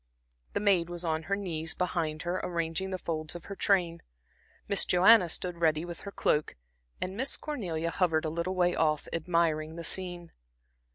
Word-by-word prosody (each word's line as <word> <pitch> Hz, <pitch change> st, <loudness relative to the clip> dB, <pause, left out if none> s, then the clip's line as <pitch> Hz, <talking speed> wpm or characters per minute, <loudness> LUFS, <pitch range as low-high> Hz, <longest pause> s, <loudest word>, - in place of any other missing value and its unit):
The -, -, 0 dB
maid 190 Hz, -5 st, +3 dB
was 175 Hz, 0 st, -5 dB
on 160 Hz, -1 st, 0 dB
her 200 Hz, -, +2 dB
knees 165 Hz, -5 st, -3 dB
behind 165 Hz, -4 st, -2 dB
her 180 Hz, +1 st, -1 dB
arranging 170 Hz, +2 st, -2 dB
the 185 Hz, -, -2 dB
folds 155 Hz, -2 st, -4 dB
of 175 Hz, -, -8 dB
her 200 Hz, -, -7 dB
train, 175 Hz, -4 st, +1 dB, 0.7 s
Miss 200 Hz, -, +4 dB
Joanna 180 Hz, +1 st, +6 dB
stood 175 Hz, +1 st, -2 dB
ready 160 Hz, 0 st, +2 dB
with 175 Hz, -1 st, -7 dB
her 200 Hz, -, -8 dB
cloak, 150 Hz, -5 st, 0 dB, 0.4 s
and 185 Hz, +1 st, -3 dB
Miss 265 Hz, +5 st, +1 dB
Cornelia 175 Hz, -, -3 dB
hovered 165 Hz, -3 st, +1 dB
a -, -, 0 dB
little 170 Hz, +3 st, -2 dB
way 175 Hz, -1 st, +3 dB
off, 155 Hz, -2 st, +1 dB
admiring 165 Hz, -2 st, 0 dB
the 170 Hz, -, -6 dB
scene. 175 Hz, -1 st, -2 dB
170 Hz, 175 wpm, -30 LUFS, 160-185 Hz, 0.7 s, Joanna